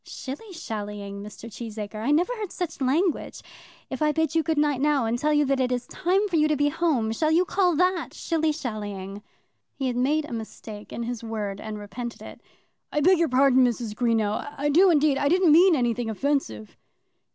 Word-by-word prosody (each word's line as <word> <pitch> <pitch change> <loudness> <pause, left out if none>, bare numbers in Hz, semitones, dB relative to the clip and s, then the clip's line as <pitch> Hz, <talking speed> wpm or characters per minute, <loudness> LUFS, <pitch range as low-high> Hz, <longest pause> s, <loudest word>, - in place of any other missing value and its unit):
"Shilly 290 +11 -8
shallying, 205 - -6
Mr. 210 +2 -10
Cheesacre! 215 -1 -7
I 235 - -1
never 345 +11 +2
heard 425 -5 -5
such 335 -5 -5
language. 310 +7 0 0.4
If 265 - -6
I 305 0 +3
bid 320 0 0
you 325 - +3
good 320 -1 -1
night, 295 -3 +1
now, 290 -4 +2
and 230 +2 -1
tell 305 +3 +1
you 295 -1 +3
that 275 0 +1
it 255 -1 +1
is 245 -1 -1
time 380 +3 0
for 350 -4 0
you 305 0 +4
to 305 - +1
go 290 +1 +1
home, 290 -9 0
shall 310 +7 0
you 345 +3 +3
call 360 -2 +2
that 360 +2 +1
shilly 320 -2 0
shallying?" 205 -8 -5 0.5
He 270 - -3
had 250 -2 -1
made 290 +5 +1
a 270 - -8
mistake 220 -1 -8
in 235 - -4
his 235 -1 -5
word 210 -3 -4
and 215 -1 -6
repented 230 +3 -7
it. - - -11 0.5
"I 295 - 0
beg 365 +3 +5
your 335 -2 +2
pardon, 260 0 +4
Mrs. 235 -3 -1
Greenow; 225 +3 0
I 290 +1 0
do 360 +6 +5
indeed. 295 -4 +3
I 285 - +2
didn't 360 -1 +4
mean 345 +3 +6
anything 240 -3 0
offensive." 220 - -2
275 Hz, 205 wpm, -25 LUFS, 225-315 Hz, 0.5 s, mean